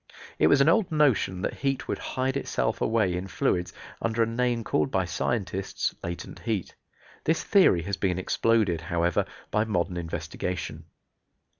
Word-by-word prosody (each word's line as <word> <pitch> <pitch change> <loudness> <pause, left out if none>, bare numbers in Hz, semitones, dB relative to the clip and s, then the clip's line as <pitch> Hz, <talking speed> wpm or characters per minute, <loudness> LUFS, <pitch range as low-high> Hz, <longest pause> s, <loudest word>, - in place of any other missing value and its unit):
It - - +5
was 145 - +5
an 140 - +4
old 180 +3 +3
notion 125 - +2
that - - -1
heat 135 0 -1
would - - -2
hide 130 +1 -2
itself 140 - -1
away 110 -6 +2
in 90 +2 -4
fluids 90 -1 0 0.3
under 115 0 +1
a - - +2
name 120 0 0
called 75 -7 +1
by 95 -1 +1
scientists 95 +2 -2
latent 85 0 -6
heat. 110 -6 -2 0.5
This 160 +1 +1
theory 180 - +4
has 100 +2 -3
been 90 -3 0
exploded, 100 -2 +1
however, 85 +1 +1 0.3
by 105 +1 +2
modern 90 -4 -1
investigation. 85 -1 -4
100 Hz, 155 wpm, -27 LUFS, 90-120 Hz, 0.5 s, It